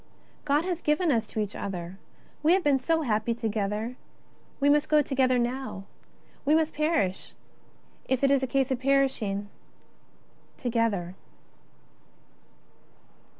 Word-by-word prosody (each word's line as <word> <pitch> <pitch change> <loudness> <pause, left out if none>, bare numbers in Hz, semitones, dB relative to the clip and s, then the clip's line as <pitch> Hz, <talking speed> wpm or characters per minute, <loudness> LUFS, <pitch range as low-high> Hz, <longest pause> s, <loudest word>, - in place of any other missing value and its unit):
^' - - -33
God 295 +3 +2
has 355 -2 -2
given 305 +2 +2
us 225 -4 +1
to 220 - -5
each 210 -1 -2
other; 180 -1 -5 0.4
we 315 +3 +4
have 380 0 +2
been 280 -2 +3
so 320 +5 +1
happy 225 -2 0
together; 220 +1 -2 0.6
we 280 - +2
must 295 +1 +3
go 300 -1 +5
together 260 -2 +2
now. 245 -4 -2 0.6
We 295 +2 +3
must 320 0 +1
perish 305 - -1 0.4
— - - -32
if 260 0 0
it 275 - +4
is 275 -1 +3
a 265 - -1
case 270 +1 0
of 255 - 0
perishing 260 -7 +1 0.6
— - - -34
together." 225 -7 0
260 Hz, 145 wpm, -27 LUFS, 215-295 Hz, 0.6 s, go